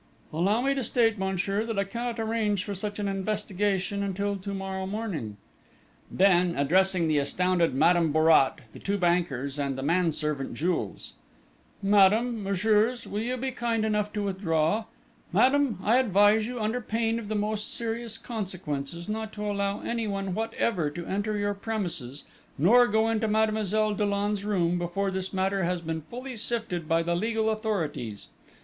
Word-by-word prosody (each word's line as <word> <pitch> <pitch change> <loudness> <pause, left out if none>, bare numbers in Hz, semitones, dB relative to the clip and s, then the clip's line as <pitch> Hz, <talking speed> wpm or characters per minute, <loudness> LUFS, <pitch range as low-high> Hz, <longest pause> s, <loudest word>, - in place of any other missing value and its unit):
"Allow 195 +8 +2
me 275 +2 +2
to 270 -2 -2
state, 225 -2 +2
monsieur, 190 +2 -1
that 225 -2 -4
I 200 - +3
cannot 235 +3 -4
arrange 220 -3 0
for 205 - -4
such 205 +2 -1
an 205 -1 -2
investigation 200 0 -1
until 200 +1 -1
to 200 +1 -6
morrow 190 -1 -4
morning!" 190 - -4 0.7
Then, 180 -2 +3
addressing 180 +4 +3
the 155 -2 +2
astounded 175 +2 +1
Madame 165 +2 +4
Bourrat, 155 -3 +4
the - - -10
two 200 +1 -1
bankers, 155 -7 0
and 140 -2 -1
the 135 - -4
manservant, 150 -4 0
Jules. 175 +3 -2 0.7
"Madame, 210 +4 +4
messieurs, 210 +5 +1
will 205 - -4
you 250 +3 -2
be 260 +1 -2
kind 235 -3 -1
enough 210 -1 0
to 210 -1 -2
withdraw? 185 0 0 0.5
Madame, 265 -4 +3
I 225 +4 +4
advise 210 -2 +4
you, 245 0 -5
under 220 +3 -1
pain 225 +1 -1
of 220 - -8
the 215 - -2
most 210 0 -1
serious 230 -1 -3
consequences, 170 - -5
not 220 0 -3
to 210 0 -5
allow 200 0 -1
anyone 200 -5 -2
whatever 220 -6 -1
to 170 +3 -7
enter 205 +2 -2
your 205 0 0
premises, 175 - -4 0.3
nor 235 - +6
go 220 +1 +2
into 225 -1 0
Mademoiselle 215 -1 +1
Dollon's 205 0 0
room, 180 -4 +1
before 190 +3 -1
this 190 0 -3
matter 190 0 0
has 180 +1 0
been 160 -1 -4
fully 250 - -8
sifted 220 -7 -1
by 165 +1 +3
the 170 +1 0
legal 220 +3 0
authorities. 165 - -3
200 Hz, 160 wpm, -27 LUFS, 175-220 Hz, 0.7 s, nor